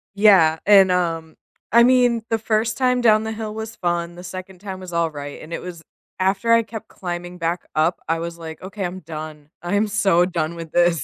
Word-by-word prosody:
Yeah, 190 -7 +5
and, 195 -2 +7
um, 165 -3 -1 0.4
I 235 +1 +7
mean, 245 -2 +4
the 225 - +1
1st 220 0 0
time 250 -1 +2
down 215 -2 +4
the 220 - -3
hill 215 -1 -5
was 220 +1 -6
fun, 175 -1 -2
the 180 - -10
2nd 185 0 -8
time 190 -2 -7
was 180 -2 -9
all 170 -1 +1
right, 145 -1 -8
and 160 - -11
it - - -4
was 175 -2 -8 0.4
After 195 +5 +1
I 230 - +6
kept 220 0 -8
climbing 175 0 -6
back 165 +1 -2
up, 160 +3 +2
I 165 0 0
was, 170 0 -5
like, 160 -1 -9
"Okay, 195 +1 -5
I'm 180 +1 -5
done. 155 -2 -8
I'm 205 +5 0
so 195 -4 +3
done 170 -2 -2
with 165 -2 -8
this." 175 -4 +2
180 Hz, 210 wpm, -21 LUFS, 165-215 Hz, 0.4 s, and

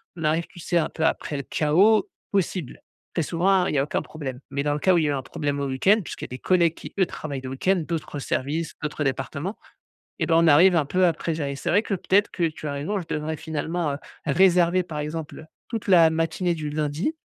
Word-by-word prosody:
On 165 - -7
arrive, 160 +2 +1
tu - - -15
sais, 175 +1 0
un 165 - +1
peu 160 - -2
après 150 -2 -1
le 140 - -4
chaos 195 - +3 0.2
possible. 185 -7 -2 0.3
Très 165 - +1
souvent, 180 +4 +2
il - - -2
y - - +1
a - - +3
aucun 145 - -2
problème 135 -5 -6
mais 140 0 -1
dans 145 +1 0
le 150 - -2
cas 185 +4 +4
où 175 - +4
il - - +1
y - - +1
a - - +1
eu - - +1
un 135 - -2
problème 145 +1 -3
au 140 - -1
week-end 160 +12 +3
puisqu'il - - -7
y - - -7
a - - -30
des 125 - -6
collègues 170 +1 +2
qui - - -10
eux 190 - +5
travaillent 140 -4 -6
le 130 - -6
week-end 175 +7 +1
d'autres 160 -3 -4
services, 150 +4 -2
d'autres 150 0 -2
départements 140 - -3 0.6
et - - +1
bah, 165 - +2
on 165 - +4
arrive 175 +5 +6
un 155 -3 +3
peu 180 +6 +2
après 165 -1 0
gérer. 145 -3 -3
C'est - - -4
vrai 205 - +4
que 220 - -4
peut-être 195 +3 +2
que 175 - -3
tu 155 -1 -2
as 145 - -2
raison, 160 +9 -2
je 175 - -7
devrais 155 0 -3
finalement, 160 0 -2
heu, - - -4 0.3
réserver, 180 +2 +4
par 155 -4 -6
exemple, 155 +1 -5 0.2
toute 225 -3 -4
la 170 -4 +7
matinée 165 +2 0
du 155 -2 -4
lundi 150 - -1
160 Hz, 250 wpm, -24 LUFS, 145-180 Hz, 0.6 s, la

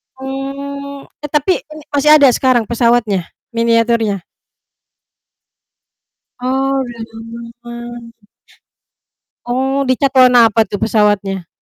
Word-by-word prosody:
Oh. 275 +1 -6 0.2
E - - -3
tapi 300 +5 +1
ini 305 0 -11
masih 300 +2 +5
ada 285 -3 +6
sekarang 250 -1 +2
pesawatnya, 230 -6 +1 0.2
miniaturnya? 230 -4 +1 2.2
Oh 270 +2 0
udah 240 -1 -9 0.6
lama. 235 -2 -10 1.2
Oh, 265 +3 0
di 255 - +3
cat 275 - +2
warna 250 -3 +7
apa 220 +1 +2
tuh 205 - -6
pesawatnya? 205 -4 +1
240 Hz, 100 wpm, -16 LUFS, 230-275 Hz, 2.2 s, warna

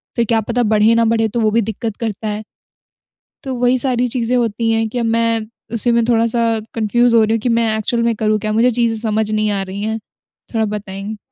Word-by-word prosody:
फिर 235 - +1
क्या 225 0 +2
पता 240 +3 -1
बढ़े 215 +1 +3
ना 230 - +3
बढ़े 225 0 +2
तो 235 - -2
वो 215 - +3
भी 230 - +2
दिक्कत 220 0 -4
करता 220 -1 -4
है। 210 +1 -3 1.0
तो 265 -2 -4
वही 245 +1 +2
सारी 250 -1 +1
चीज़ें 245 0 0
होती 230 -1 0
हैं 225 0 +1
कि 245 - -4
अब 230 - 0
मैं 230 0 +1 0.3
उसी 235 +1 +2
में 235 -1 +3
थोड़ा-सा 230 0 +2 0.3
कन्फ्यूज़ 235 +2 +2
हो 225 - +6
रही 220 - 0
हूँ 225 - 0
कि 245 - -1
मैं 230 -2 +1
एक्चुअल 235 +2 -1
में 235 0 +1
करूँ 215 0 +1
क्या? 215 0 -2
मुझे 235 +3 +3
चीज़ें 230 -1 +1
समझ 215 -1 0
नहीं 215 0 +1
आ 200 -1 0
रही 195 +2 -6
है, 220 +1 -2 0.6
थोड़ा 220 - +2
बताएँगे? 205 0 -5
225 Hz, 230 wpm, -17 LUFS, 215-235 Hz, 1.0 s, हो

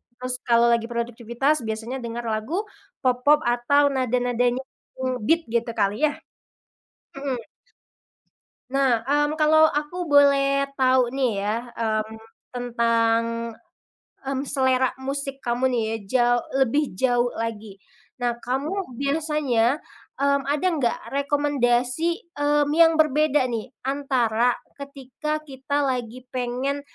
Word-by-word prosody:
terus 255 0 -4
kalau 235 0 +5
lagi 235 -1 +2
produktivitas 240 +4 -1
biasanya 220 +4 -4
dengar 235 0 -5
lagu 225 - -1 0.4
pop-pop 255 +4 +4
atau 245 +4 +3
nada-nadanya 245 -1 0 0.4
yang 260 - -2
nge-beat 325 +10 +2
gitu 235 0 0
kali 205 +10 +1
ya? 295 - -3 1.0
Mhm. 275 -3 -3 1.3
Nah, 265 -4 +2
mmm, 295 +4 +1
kalau 315 0 +5
aku 310 +4 -2
boleh 275 -1 +4
tahu 255 -2 +3
nih 245 -6 -1
ya, 210 +2 0 0.2
mmm, 220 -1 -2 0.4
tentang, 230 -2 +1 1.0
mmm, 270 0 -2
selera 260 -2 +2
musik 275 +1 -4
kamu 245 +2 +1
nih 245 -2 0
ya, 225 - -1 0.2
jau 245 -1 +4 0.3
lebih 285 +5 +1
jauh 245 +1 +2
lagi. 220 -3 -5 0.4
Nah, 240 -1 -2
kamu 275 +3 -3
biasanya, 280 -4 +1 0.4
mmm, 280 0 +1
ada 295 +5 0
nggak 235 -2 +1
rekomendasi, 285 - 0 0.2
mmm, 290 0 +2
yang 325 0 +5
berbeda 300 -2 +3
nih, 235 -1 -3 0.2
antara 250 -4 +1 0.2
ketika 280 +3 -5
kita 285 0 -2
lagi 250 -1 -3
pengen, 255 +3 -2
260 Hz, 115 wpm, -24 LUFS, 240-285 Hz, 1.3 s, kalau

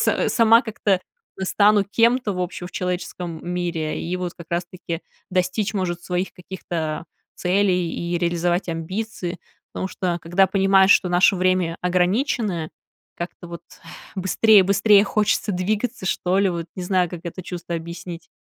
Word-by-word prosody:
с - - +2
сама 230 +1 +6
как-то 205 -4 0 0.4
стану 205 +1 +4
кем-то, 230 +2 +2
в 180 - -4
общем, 180 0 -4
в - - -18
человеческом 180 -2 -4
мире. 170 -3 -2
И 175 +2 -2
вот 180 -1 -4
как 170 - -11
раз-таки 175 -1 -4 0.3
достичь, 185 +4 0
может, 175 -3 -2
своих 180 +1 -2
каких-то 170 -4 -5 0.3
целей 180 -2 +1
и 170 0 -2
реализовать 175 +1 0
амбиции, 180 +2 -4 0.3
потому 190 - -3
что, 180 -2 -2
когда 175 +3 +3
понимаешь, 195 0 +4
что 180 - +3
наше 185 +2 +4
время 185 -2 +1
ограниченное, 180 - 0 0.5
как-то 175 +1 -7
вот 170 -1 -8 0.5
быстрее-быстрее 200 +1 +5
хочется 210 0 +1
двигаться, 205 +4 -2
что 185 0 +1
ли, 200 -1 +3
вот, 170 -2 -4
не 185 - -4
знаю, 180 -2 +1
как 175 - -7
это 175 +2 -6
чувство 175 -1 -6
объяснить. 170 +1 -8
180 Hz, 145 wpm, -22 LUFS, 175-195 Hz, 0.5 s, сама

